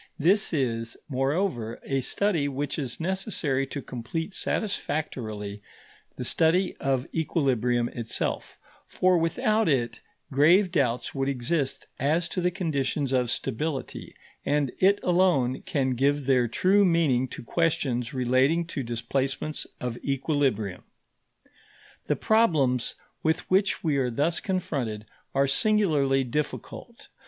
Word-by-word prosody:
This 190 Hz, +7 st, +3 dB
is, 115 Hz, -7 st, -1 dB
moreover, 135 Hz, -, -1 dB
a 135 Hz, -1 st, -1 dB
study 170 Hz, 0 st, +1 dB
which 140 Hz, +2 st, -3 dB
is 130 Hz, -4 st, -4 dB
necessary 165 Hz, -7 st, -1 dB
to 140 Hz, 0 st, -5 dB
complete 160 Hz, -, -5 dB
satisfactorily 110 Hz, -, -3 dB, 0.5 s
the 125 Hz, -, -5 dB
study 170 Hz, +7 st, +2 dB
of 135 Hz, -2 st, 0 dB
equilibrium 125 Hz, -7 st, +1 dB
itself; 115 Hz, -2 st, -3 dB, 0.3 s
for 185 Hz, -1 st, +2 dB
without 215 Hz, +5 st, +1 dB
it 120 Hz, -5 st, 0 dB, 0.3 s
grave 170 Hz, +8 st, +5 dB
doubts 125 Hz, -8 st, 0 dB
would 135 Hz, 0 st, -1 dB
exist 135 Hz, +2 st, -1 dB
as 160 Hz, +5 st, +1 dB
to 180 Hz, -, -2 dB
the 180 Hz, -, +2 dB
conditions 150 Hz, -6 st, -1 dB
of 125 Hz, -2 st, +1 dB
stability, 135 Hz, +4 st, -3 dB, 0.3 s
and 145 Hz, -2 st, +1 dB
it 195 Hz, +2 st, +5 dB
alone 175 Hz, -9 st, +2 dB
can 140 Hz, -8 st, 0 dB
give 140 Hz, +3 st, +1 dB
their 125 Hz, -2 st, +3 dB
true 195 Hz, -, +3 dB
meaning 160 Hz, -8 st, +3 dB
to -, -, -8 dB
questions 125 Hz, -5 st, 0 dB
relating 130 Hz, +6 st, +2 dB
to 165 Hz, -4 st, -4 dB
displacements 130 Hz, +5 st, -2 dB
of 125 Hz, -1 st, -4 dB
equilibrium. 135 Hz, -, -1 dB, 1.3 s
The -, -, +2 dB
problems 155 Hz, -, +2 dB, 0.3 s
with 160 Hz, +1 st, +1 dB
which 195 Hz, +1 st, +2 dB
we 155 Hz, -4 st, +1 dB
are 130 Hz, -2 st, +1 dB
thus 150 Hz, +8 st, 0 dB
confronted 135 Hz, -, -2 dB, 0.3 s
are 140 Hz, +1 st, +4 dB
singularly 145 Hz, -5 st, +2 dB
difficult. 150 Hz, -, -5 dB
140 Hz, 120 wpm, -26 LUFS, 125-170 Hz, 1.3 s, grave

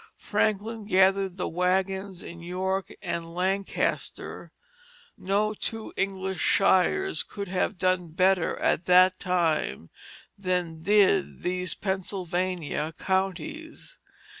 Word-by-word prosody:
Franklin 215 Hz, +1 st, -1 dB
gathered 190 Hz, -1 st, +3 dB
the 180 Hz, -, -2 dB
wagons 190 Hz, +2 st, -1 dB
in 170 Hz, 0 st, -9 dB
York 190 Hz, +2 st, -2 dB
and 170 Hz, -2 st, -4 dB
Lancaster; 190 Hz, +2 st, -2 dB, 0.6 s
no 205 Hz, +3 st, 0 dB
two 225 Hz, +1 st, -5 dB
English 190 Hz, -2 st, -2 dB
shires 200 Hz, -, +3 dB
could 200 Hz, -1 st, -6 dB
have 185 Hz, +2 st, -1 dB
done 185 Hz, -1 st, +1 dB
better 185 Hz, +2 st, +2 dB
at 170 Hz, -, +1 dB
that 185 Hz, +1 st, +6 dB
time 165 Hz, -, 0 dB, 0.4 s
than 180 Hz, -4 st, -2 dB
did 195 Hz, 0 st, +3 dB
these 180 Hz, -4 st, -1 dB
Pennsylvania 180 Hz, -4 st, -2 dB
counties. 195 Hz, -, -3 dB
185 Hz, 100 wpm, -27 LUFS, 180-195 Hz, 0.6 s, that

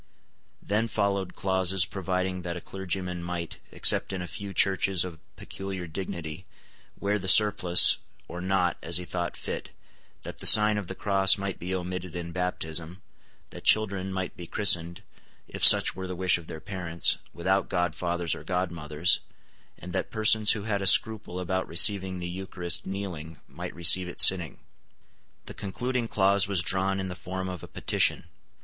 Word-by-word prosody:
Then 110 Hz, +3 st, -1 dB
followed 100 Hz, -4 st, -2 dB
clauses 95 Hz, 0 st, +1 dB
providing 95 Hz, -1 st, -3 dB
that 85 Hz, 0 st, -5 dB
a -, -, -6 dB
clergyman 90 Hz, -1 st, -5 dB
might, 85 Hz, -1 st, -6 dB
except -, -, +4 dB
in 95 Hz, -, -4 dB
a 90 Hz, -, -5 dB
few 100 Hz, +3 st, -8 dB
churches 95 Hz, -2 st, +2 dB
of 85 Hz, -3 st, -9 dB, 0.2 s
peculiar 95 Hz, -2 st, -7 dB
dignity, 85 Hz, 0 st, -7 dB, 0.5 s
wear 105 Hz, +1 st, -1 dB
the 95 Hz, -, -7 dB
surplice 95 Hz, -3 st, +5 dB, 0.3 s
or 90 Hz, -, -8 dB
not 90 Hz, -2 st, 0 dB
as 85 Hz, 0 st, +1 dB
he 90 Hz, -, -5 dB
thought 85 Hz, -2 st, -5 dB
fit, -, -, -6 dB, 0.5 s
that -, -, -9 dB
the -, -, +3 dB
sign 105 Hz, -1 st, +8 dB
of 100 Hz, -, -8 dB
the 95 Hz, -, -7 dB
cross 95 Hz, -1 st, +4 dB
might 100 Hz, -1 st, -5 dB
be 90 Hz, +2 st, -4 dB
omitted 90 Hz, -1 st, -6 dB
in 85 Hz, -1 st, -6 dB
baptism, 85 Hz, 0 st, -5 dB, 0.5 s
that -, -, -11 dB
children 100 Hz, -3 st, +1 dB
might 95 Hz, -1 st, -5 dB
be 85 Hz, -, -10 dB
christened, 85 Hz, -4 st, +2 dB, 0.4 s
if -, -, -8 dB
such -, -, +6 dB
were 95 Hz, 0 st, -6 dB
the 90 Hz, -, -6 dB
wish 90 Hz, 0 st, +2 dB
of 85 Hz, -, -15 dB
their 80 Hz, -, -8 dB
parents, 90 Hz, -2 st, -1 dB
without 95 Hz, +3 st, -1 dB
godfathers 85 Hz, -1 st, -2 dB
or -, -, -8 dB
godmothers, 85 Hz, -3 st, 0 dB, 0.6 s
and 90 Hz, 0 st, -10 dB
that 95 Hz, -, -3 dB
persons 110 Hz, -1 st, +3 dB
who 110 Hz, -3 st, -6 dB
had 100 Hz, -2 st, -2 dB
a 95 Hz, -, -1 dB
scruple 105 Hz, -2 st, +3 dB
about 95 Hz, +1 st, -3 dB
receiving 95 Hz, +2 st, +1 dB
the 90 Hz, -1 st, -5 dB
Eucharist 90 Hz, -1 st, -5 dB
kneeling 90 Hz, -5 st, -7 dB
might -, -, -9 dB
receive 85 Hz, +2 st, +5 dB
it 90 Hz, -, -10 dB
sitting. 90 Hz, -4 st, +5 dB, 0.9 s
The -, -, -9 dB
concluding 120 Hz, +4 st, -4 dB
clause 100 Hz, -1 st, +2 dB
was 95 Hz, -4 st, 0 dB
drawn 95 Hz, +2 st, 0 dB
in 95 Hz, -, -4 dB
the -, -, -5 dB
form 95 Hz, +1 st, -6 dB
of 90 Hz, -1 st, -7 dB
a -, -, -10 dB
petition. -, -, 0 dB
95 Hz, 170 wpm, -26 LUFS, 85-95 Hz, 0.9 s, sign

